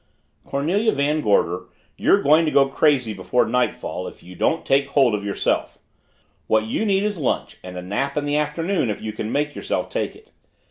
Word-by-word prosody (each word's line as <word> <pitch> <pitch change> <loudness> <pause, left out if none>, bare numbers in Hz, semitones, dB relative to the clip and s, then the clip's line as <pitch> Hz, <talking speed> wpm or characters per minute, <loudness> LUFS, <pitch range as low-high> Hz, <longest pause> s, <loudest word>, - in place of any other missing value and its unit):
"Cornelia 180 +11 +1
Van 145 +2 +1
Gorder, 90 - +1 0.3
you're - - +3
going 155 +4 +5
to 155 - 0
go 140 -1 +5
crazy 135 -5 +2
before 115 +5 +1
nightfall 125 +3 -1
if - - -12
you 90 - -12
don't 160 - 0
take 140 +1 +2
hold 135 -4 +3
of 105 -1 -2
yourself. 100 -1 -1 0.7
What 110 0 +3
you 115 - -1
need 195 0 +2
is 205 -4 -2
lunch 140 - -2
and 90 0 -8
a 90 - -5
nap 120 +10 -2
in 145 - 0
the 145 0 0
afternoon 150 - 0
if 105 - -3
you 110 -1 -5
can 110 +1 -4
make 150 +1 0
yourself - - -3
take - - -3
it. 440 +2 -19
140 Hz, 195 wpm, -22 LUFS, 110-150 Hz, 0.7 s, going